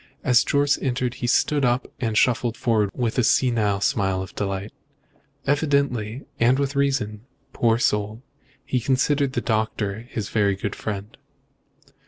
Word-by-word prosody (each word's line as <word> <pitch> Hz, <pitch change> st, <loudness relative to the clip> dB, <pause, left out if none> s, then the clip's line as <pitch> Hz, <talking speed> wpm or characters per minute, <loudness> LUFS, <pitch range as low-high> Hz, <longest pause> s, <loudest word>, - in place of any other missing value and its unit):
As 125 Hz, -5 st, +4 dB
Jorce 145 Hz, 0 st, +2 dB
entered 125 Hz, -1 st, -1 dB
he 120 Hz, -, 0 dB
stood 145 Hz, +4 st, +2 dB
up 125 Hz, +1 st, +2 dB
and 110 Hz, -3 st, -1 dB
shuffled 120 Hz, -1 st, +2 dB
forward 110 Hz, -4 st, +1 dB
with 120 Hz, +1 st, -1 dB
a -, -, +3 dB
senile 110 Hz, -5 st, +2 dB
smile 95 Hz, -2 st, +1 dB
of 95 Hz, -, -11 dB
delight. 100 Hz, +1 st, -3 dB, 0.7 s
Evidently 140 Hz, -5 st, 0 dB, 0.2 s
and 120 Hz, +3 st, +4 dB
with 140 Hz, 0 st, -1 dB
reason, 130 Hz, -7 st, 0 dB, 0.3 s
poor 115 Hz, -1 st, +2 dB
soul 105 Hz, 0 st, -1 dB, 0.4 s
he 125 Hz, -, 0 dB
considered 135 Hz, +2 st, +1 dB
the -, -, -1 dB
doctor 110 Hz, -2 st, -1 dB
his 105 Hz, -3 st, -4 dB
very 100 Hz, -3 st, +2 dB
good 100 Hz, +1 st, -4 dB
friend. 105 Hz, -1 st, -6 dB
120 Hz, 145 wpm, -23 LUFS, 105-130 Hz, 0.7 s, As